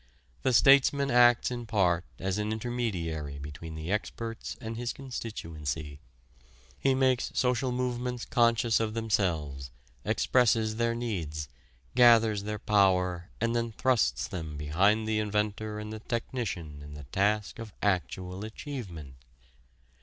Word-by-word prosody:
The 130 - +2
statesman 140 +2 +5
acts 120 0 +5
in 120 -2 -5
part 90 -5 +2
as 95 +2 -2
an 105 +1 -1
intermediary 95 -11 -3
between 75 +3 -8
the 80 +3 -5
experts 115 +2 -4
and 115 0 -5
his 120 +1 -3
constituency. 80 - -5 0.8
He 135 -1 +3
makes 130 -1 +2
social 125 0 +1
movements 125 -1 -2
conscious 115 -2 +3
of 110 -1 -2
themselves, 85 - -1 0.3
expresses 110 -3 +2
their 115 0 +1
needs, 80 - -3 0.4
gathers 115 -4 +6
their 105 0 -3
power 90 -4 +2
and 115 0 0
then 115 -1 -1
thrusts 110 - +1
them 80 -4 -6
behind 100 +9 +2
the 110 -1 +1
inventor 105 0 -1
and 105 0 -6
the 110 - -6
technician 100 - -4
in 75 0 -10
the 75 - -9
task 105 +2 0
of 115 -2 -7
actual 95 -1 -1
achievement. 110 - -7
105 Hz, 130 wpm, -29 LUFS, 85-120 Hz, 0.8 s, gathers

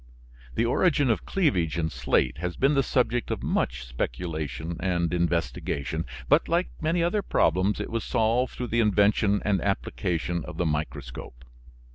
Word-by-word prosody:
The 115 - +2
origin 140 +1 +3
of 110 - -2
cleavage 90 - +1
in 80 -1 -1
slate 65 +3 +1
has 90 +1 -3
been 135 +3 +3
the 140 - +4
subject 120 -2 0
of - - -3
much - - -1
speculation 75 +5 -4
and 85 -3 0
investigation, 85 -2 -1 0.2
but 145 +3 +4
like 175 +2 +1
many 165 +2 +1
other 180 +5 +1
problems 95 - +2
it - - -4
was 115 -1 -1
solved 115 +3 +1
through 125 -1 -4
the 120 - +1
invention 105 -1 +3
and 100 -2 +2
application 85 -2 -1
of - - -8
the 90 - 0
microscope. 65 -5 -4
95 Hz, 155 wpm, -26 LUFS, 80-120 Hz, 0.2 s, the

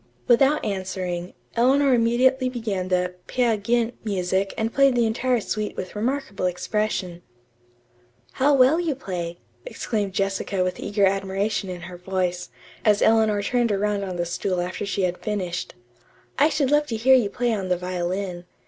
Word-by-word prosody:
'" - - -37
Without 270 +5 +4
answering, 185 -3 -3 0.2
Eleanor 265 +3 +4
immediately 255 +2 +3
began 215 -7 -3
the 180 -1 0
"Peer 240 -3 +2
Gynt" 230 +3 0
music 195 -1 0
and 225 +1 -1
played 275 -1 +4
the 240 -1 +3
entire 240 +2 +1
suite 215 0 -3
with 185 - -6
remarkable 225 -4 -1
expression. 180 -1 -2 1.1
"How 280 +3 +2
well 270 +5 +5
you 330 -5 -1
play!" 175 -8 -5 0.3
exclaimed 215 - -3
Jessica 195 0 -1
with 180 0 -3
eager 205 0 +1
admiration 195 +1 -1
in 180 -1 -6
her 175 +1 -9
voice, 180 -1 -2 0.3
as 210 -2 +3
Eleanor 220 -2 +3
turned 240 +1 +1
around 205 0 0
on 185 -2 -4
the 175 0 -1
stool 180 +1 -2
after 180 +3 -3
she 200 0 -1
had 180 0 -1
finished. 185 -5 -3 0.6
"I 295 +3 +5
should 290 -4 0
love 295 0 +3
to 235 - -3
hear 245 +4 +4
you 245 -6 +4
play 240 +3 0
on 195 -3 -3
the 180 - +2
violin. 180 0 -3
205 Hz, 165 wpm, -24 LUFS, 185-240 Hz, 1.1 s, well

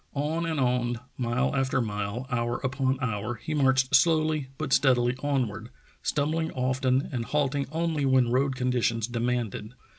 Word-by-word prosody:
On 155 +4 -1
and 160 -3 -1
on, 125 -2 +1 0.2
mile 125 +3 0
after 135 0 +1
mile, 105 +1 -3
hour 120 -1 0
upon 135 0 0
hour, 115 0 -2
he 150 +7 -5
marched 135 -3 +2
slowly 155 -1 +3
but - - -2
steadily 125 -2 +3
onward, 120 -6 -1 0.3
stumbling 160 +2 0
often 130 +1 +1
and 125 -4 -2
halting 140 +1 0
only 160 -2 -1
when 130 -3 +3
road 135 +1 +1
conditions 125 -3 0
demanded. 120 -2 -2
130 Hz, 145 wpm, -27 LUFS, 120-140 Hz, 0.3 s, slowly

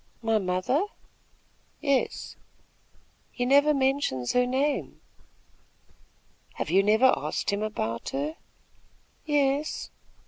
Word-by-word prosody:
"My 225 -1 +2
mother?" 185 - 0 0.9
"Yes." 280 -3 -1 1.0
"He 245 - -2
never 285 +3 +5
mentions 265 - 0
her 250 0 +3
name." 275 +3 -1 1.6
"Have - - -3
you 190 +2 +5
never 220 +6 +4
asked - - -2
him 200 +1 -1
about 115 - -3
her?" 150 +4 -3 0.9
"Yes." 290 0 0
250 Hz, 95 wpm, -27 LUFS, 190-280 Hz, 1.6 s, never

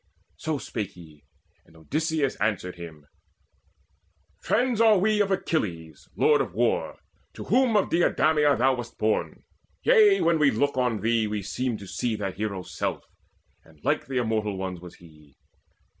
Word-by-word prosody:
So 155 -1 -2
spake 110 -5 -5
he, 80 -4 -16 0.4
and 80 - -21
Odysseus 150 - -1
answered 95 -4 -1
him: 80 -4 -11 1.3
"Friends 245 -3 +1
are 220 -2 +6
we 210 +2 +2
of 200 - +1
Achilles 85 - -3
lord - - +4
of - - -5
war, - - 0 0.4
To - - -7
whom 245 -1 +3
of 200 - 0
Deidameia 155 -3 +3
thou 130 +2 +3
wast 120 -2 -7
born 110 0 -1 0.4
Yea, 430 -5 +5
when 165 -1 +2
we 150 -2 +5
look 140 +5 0
on 125 -5 0
thee 115 0 +1
we 105 -1 -3
seem 120 +5 -2
to 100 - -10
see 115 +4 -2
That 100 -3 -4
Hero's 100 -4 -5
self; - - -3 0.6
and 80 -1 -21
like - - 0
the 135 -1 -3
Immortal 110 -4 -1
Ones 95 -2 -5
Was 90 -1 -11
he. 75 -4 -19
115 Hz, 160 wpm, -26 LUFS, -, 1.3 s, are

